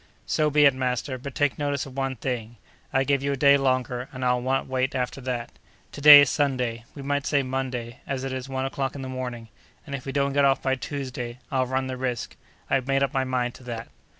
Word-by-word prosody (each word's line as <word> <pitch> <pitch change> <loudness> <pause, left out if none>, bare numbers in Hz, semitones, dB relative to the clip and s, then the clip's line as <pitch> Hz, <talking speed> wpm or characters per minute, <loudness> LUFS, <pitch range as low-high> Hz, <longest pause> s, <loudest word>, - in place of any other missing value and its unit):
"So 155 -1 +1
be 150 0 +5
it, 140 - +6
master; 130 0 -2
but 140 +2 -8
take 145 -3 +1
notice 145 -1 -1
of 135 -2 -11
one 135 -1 -1
thing: 120 -2 -4 0.4
I 135 0 +2
give 140 0 +1
you 140 0 0
a - - -3
day 140 +1 +6
longer, 130 -2 0
and 130 0 -4
I'll 125 0 +2
not 135 +2 0
wait 130 +1 -1
after 125 +1 -2
that. 125 -2 -3 0.4
To 145 - -9
day 145 0 +11
is 145 - +3
Sunday; 125 -5 -1
we 140 - -8
might 145 +1 -1
say 145 -2 +2
Monday, 130 -3 -4
as 135 -2 -3
it 135 -1 -3
is 130 +1 -5
one 130 0 -2
o'clock 135 0 -3
in 135 - -6
the - - -5
morning, 125 -3 -5 0.4
and 140 - -8
if 135 -1 -5
we - - -2
don't 140 0 0
get 140 0 +3
off 135 -1 +4
by 130 - +2
Tuesday, 130 -3 -5
I'll 130 -2 +1
run 130 +1 -1
the 130 -1 -4
risk. 125 -2 -3 0.3
I've 135 -1 0
made 135 0 +2
up 140 - -1
my 135 -1 +1
mind 125 -2 -1
to - - -14
that!" 115 -1 -6
130 Hz, 240 wpm, -25 LUFS, 125-140 Hz, 0.4 s, day